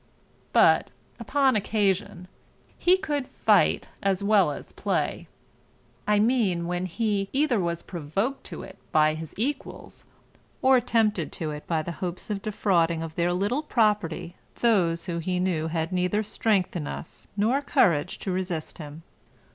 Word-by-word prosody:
But, - - +5 0.3
upon 270 -3 +2
occasion, 195 -3 0 0.5
he 360 +1 +4
could 295 -8 -2
fight - - +2
as 195 -1 0
well 200 -5 +4
as 145 - -7
play: - - -2 0.8
I 210 0 +4
mean 210 -6 +2
when 180 +1 -2
he 200 +1 -1
either 275 -5 +2
was 170 -2 -2
provoked 195 - -3
to - - -7
it - - -12
by 155 0 +4
his 160 0 -8
equals, 270 +8 -4 0.5
or 260 -1 +5
tempted 220 -8 +1
to 155 -2 -3
it 150 0 -8
by 160 -2 0
the 170 - -4
hopes 180 +3 -4
of 200 -1 -2
defrauding 170 -6 +1
of 160 -1 -6
their 170 +1 +1
little 205 +10 0
property 210 - 0 0.3
those 175 -8 +2
who 170 -2 -3
he 180 +2 -1
knew 175 -4 0
had 160 +1 -2
neither 180 +4 +1
strength 210 -3 0
enough 160 0 -6
nor 235 +7 +2
courage 175 - +2
to 190 - -2
resist 180 -4 -3
him. 150 +1 -9
185 Hz, 145 wpm, -26 LUFS, 170-220 Hz, 0.8 s, But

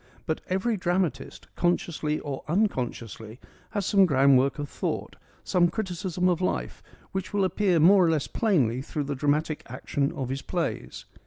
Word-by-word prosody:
But 160 - -2
every 195 +5 0
dramatist, 175 -7 -2
consciously 165 -3 0
or 140 -2 -5
unconsciously, 120 - -2 0.3
has 205 -3 -2
some 195 -1 +5
groundwork 135 -2 +4
of 145 -1 -4
thought, - - -4 0.3
some 175 -1 +3
criticism 180 -3 -2
of 180 -1 +1
life, 185 - -2 0.3
which 190 +1 -4
will 200 - +3
appear 185 -1 +2
more 180 +2 +6
or - - +3
less 155 -4 +1
plainly 135 - +1
through 145 +2 -3
the 145 0 -3
dramatic 150 +2 0
action 140 +3 -2
of 135 -6 -4
his 135 +1 -3
plays. - - -4
160 Hz, 155 wpm, -27 LUFS, 140-185 Hz, 0.3 s, more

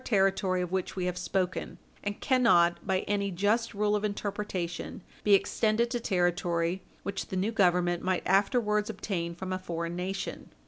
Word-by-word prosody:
442 230 -5 +1
territory 190 -1 +2
of 180 - -5
which 190 -1 -2
we 185 -2 -1
have 180 -1 -1
spoken, 185 0 -2 0.3
and 205 0 -3
cannot, 200 -10 +4
by 190 -1 +2
any 200 -1 -1
just 205 +5 +1
rule 210 +1 +2
of 210 - -1
interpretation, 200 -4 -3 0.2
be 205 -1 +6
extended 225 +3 +1
to 240 - 0
territory 175 -3 0 0.2
which 200 0 -3
the 190 - -3
new 200 +4 +1
Government 175 -4 +2
might 185 0 0
afterwards 210 +2 +2
obtain 175 -5 -3
from 185 +1 -4
a 185 - -2
foreign 170 -2 -4
nation. 190 +2 -4
190 Hz, 170 wpm, -29 LUFS, 180-210 Hz, 0.3 s, be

